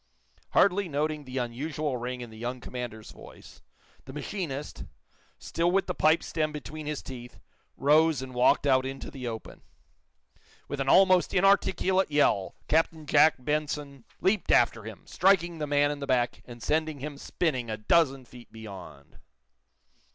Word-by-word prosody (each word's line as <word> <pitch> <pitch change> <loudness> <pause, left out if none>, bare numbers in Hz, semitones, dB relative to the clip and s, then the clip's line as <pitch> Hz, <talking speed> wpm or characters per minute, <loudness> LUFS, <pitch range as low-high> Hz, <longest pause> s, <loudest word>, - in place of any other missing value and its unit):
Hardly 195 0 +3
noting 150 0 -2
the 130 +1 -6
unusual 140 +4 -3
ring 125 +1 -4
in 120 -2 -8
the 110 - -12
young 125 +2 -4
commander's 120 -3 -7
voice, - - -14 0.4
the 135 - -10
machinist, 150 -3 -5 0.5
still 170 +1 -1
with 195 +2 +2
the 180 - -3
pipe 160 -1 +3
stem 155 -1 -2
between 150 0 -7
his 150 -1 -4
teeth, 125 -2 -10 0.4
rose 155 +1 +4
and 130 -1 -9
walked 125 +3 +3
out 130 -2 +4
into 135 +1 -6
the 130 -3 -6
open. 115 -1 -7 1.1
With 145 - -5
an 135 0 -1
almost 185 0 +5
inarticulate 190 -1 +3
yell 145 -10 +2
Captain 160 0 +1
Jack 145 +2 +5
Benson 145 -1 -3 0.2
leaped 190 +2 +1
after 115 -3 +3
him, 110 -2 -10
striking 175 -3 +2
the 150 - -2
man 145 0 +2
in 145 - -5
the 140 - -5
back 125 -2 0
and 120 -1 -11
sending 155 -1 0
him 145 0 -5
spinning 130 -10 -2
a 110 - -3
dozen 135 +3 +2
feet 120 0 -15
beyond. 95 -10 -11
145 Hz, 155 wpm, -28 LUFS, 125-160 Hz, 1.1 s, almost